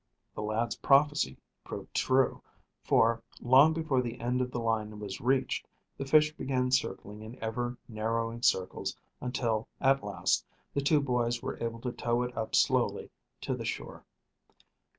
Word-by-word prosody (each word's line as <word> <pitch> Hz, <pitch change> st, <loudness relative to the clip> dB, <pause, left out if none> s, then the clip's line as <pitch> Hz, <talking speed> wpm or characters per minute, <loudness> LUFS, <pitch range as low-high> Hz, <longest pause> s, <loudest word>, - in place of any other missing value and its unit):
The -, -, -5 dB
lad's 110 Hz, +2 st, -1 dB
prophecy 140 Hz, -, +3 dB, 0.3 s
proved -, -, -8 dB
true, 130 Hz, 0 st, +2 dB, 0.4 s
for, 115 Hz, 0 st, +3 dB, 0.2 s
long 135 Hz, +5 st, +6 dB
before 155 Hz, -5 st, +1 dB
the 120 Hz, -2 st, -5 dB
end 125 Hz, +2 st, 0 dB
of 125 Hz, -, -1 dB
the 125 Hz, -, -3 dB
line 110 Hz, -2 st, -1 dB
was 100 Hz, -2 st, -6 dB
reached, 130 Hz, +2 st, +1 dB, 0.3 s
the 135 Hz, -, -5 dB
fish 155 Hz, +2 st, +5 dB
began 125 Hz, -3 st, -1 dB
circling 105 Hz, -4 st, -1 dB
in 110 Hz, +3 st, -9 dB
ever 120 Hz, +2 st, -3 dB
narrowing 115 Hz, +1 st, -2 dB
circles 95 Hz, -5 st, 0 dB, 0.2 s
until, 115 Hz, -3 st, -1 dB
at 135 Hz, 0 st, +3 dB
last, 100 Hz, -1 st, 0 dB, 0.3 s
the 140 Hz, -, 0 dB
two 145 Hz, +1 st, +3 dB
boys 120 Hz, -3 st, 0 dB
were -, -, -4 dB
able 115 Hz, 0 st, -3 dB
to 125 Hz, -, -2 dB
tow 120 Hz, 0 st, 0 dB
it 125 Hz, 0 st, -5 dB
up 110 Hz, -1 st, -2 dB
slowly -, -, +2 dB, 0.3 s
to -, -, -2 dB
the -, -, -6 dB
shore. -, -, -5 dB
120 Hz, 155 wpm, -30 LUFS, 115-130 Hz, 0.4 s, long